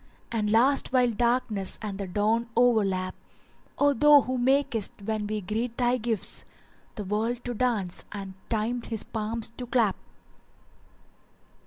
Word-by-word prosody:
* - - -34
And 210 -2 0
last 260 +6 +3
while 250 -2 +3
darkness 235 -4 0
and 205 -2 -5
the 200 - -3
dawn 215 +5 0
o'erlap: 200 -7 +2 0.6
O 285 0 +4
thou 295 +2 +7
who 255 +2 -2
makest, 245 -6 +1
when 215 0 -2
we 215 0 -2
greet 225 +5 -3
thy 245 0 +2
gifts, 225 -3 -2 0.3
* - - -33
The 210 - -4
world 220 +5 -2
to 245 - -2
dance 215 -7 -1
and 195 -2 -6 0.2
Time 230 +2 0
his 225 -2 -3
palms 220 +1 -3
to 245 - -5
clap." 235 -5 +2
225 Hz, 150 wpm, -27 LUFS, 210-245 Hz, 0.6 s, thou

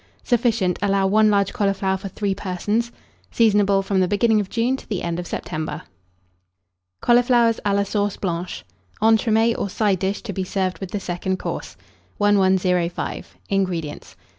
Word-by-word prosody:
Sufficient. 230 -7 +1
Allow 195 -1 +2
1 215 +2 +4
large 200 -1 +2
cauliflower 195 -1 0
for 190 +1 -6
3 200 +1 -2
persons. 205 +5 -2 0.4
Seasonable 205 -3 +3
from 195 0 0
the 185 - +3
beginning 215 +3 +2
of 200 -2 -3
June 235 +3 +1
to - - -15
the 200 -5 -2
end 170 0 -2
of 175 - -5
September. 155 0 -4 1.2
CAULIFLOWERS 240 -1 +4
A 205 - +1
LA 200 - +2
SAUCE 205 0 -1
BLANCHE. 180 -1 -4 0.4
(Entremets, 225 +1 +3
or 200 - -2
Side 200 -1 +1
dish, 195 +2 -2
to 215 -4 -5
be 190 - -2
served 185 0 -2
with 190 - -6
the 205 - -3
Second 185 0 -3
Course.) 85 - -6 0.4
1105. 190 -4 +1
INGREDIENTS. 180 -6 -2
200 Hz, 155 wpm, -22 LUFS, 185-215 Hz, 1.2 s, 1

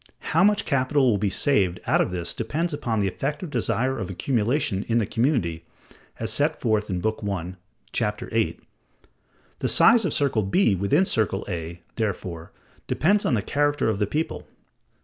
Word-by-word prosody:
How 165 +4 +5
much 205 +1 +3
capital 140 -1 +2
will 100 - +1
be 105 0 +1
saved 95 -5 +1
out - - +3
of - - 0
this 90 -2 -3
depends 155 +9 -2
upon 115 -6 -1
the 100 - +1
effective 145 - -3
desire 130 +1 0
of 95 - -4
accumulation 115 +2 0
in 115 - +1
the 115 - +2
community 100 - 0 0.6
(as 110 -1 -2
set 150 +4 0
forth 110 -3 0
in 90 -2 -2
Book 110 +2 -1
I, 95 -3 -3 0.4
Chap. 105 0 -1
VIII). 115 -1 -1 1.0
The - - 0
size 230 0 +6
of 175 - 0
circle 140 -7 +2
B 105 - +2
within 100 - +2
circle 100 - 0
A, 85 -2 -5 0.2
therefore, 90 -6 -3 0.4
depends 200 +6 +2
on 125 - +2
the 105 - -1
character 145 -3 +1
of 105 -2 -1
the 105 - +1
people. 155 +8 -3
115 Hz, 170 wpm, -24 LUFS, 95-145 Hz, 1.0 s, size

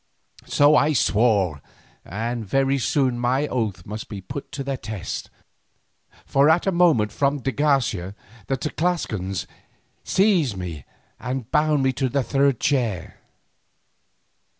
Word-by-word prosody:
So 145 +1 +5
I 150 +1 +4
swore, 100 - +2 0.4
and 115 +4 -4
very 135 +6 +1
soon 130 -1 +1
my 130 +4 +1
oath 110 - -3
must 105 +2 -7
be 105 - -6
put 135 +10 -8
to 140 - -4
the 135 0 -2
test, 110 -6 -6 1.0
for 140 +2 +3
at 165 +2 +3
a 195 - +2
motion 165 - +3
from 140 +5 0
de 135 - -1
Garcia 125 -11 0 0.3
the 135 - 0
Tlascalans 125 - -2 0.6
seized 180 - +2
me 85 -7 -6 0.3
and 125 -1 -4
bound 150 -2 +2
me 130 0 +2
to 130 +1 -1
the 140 +2 0
third 135 +1 +2
chair. 120 - -1
130 Hz, 130 wpm, -23 LUFS, 105-145 Hz, 1.0 s, So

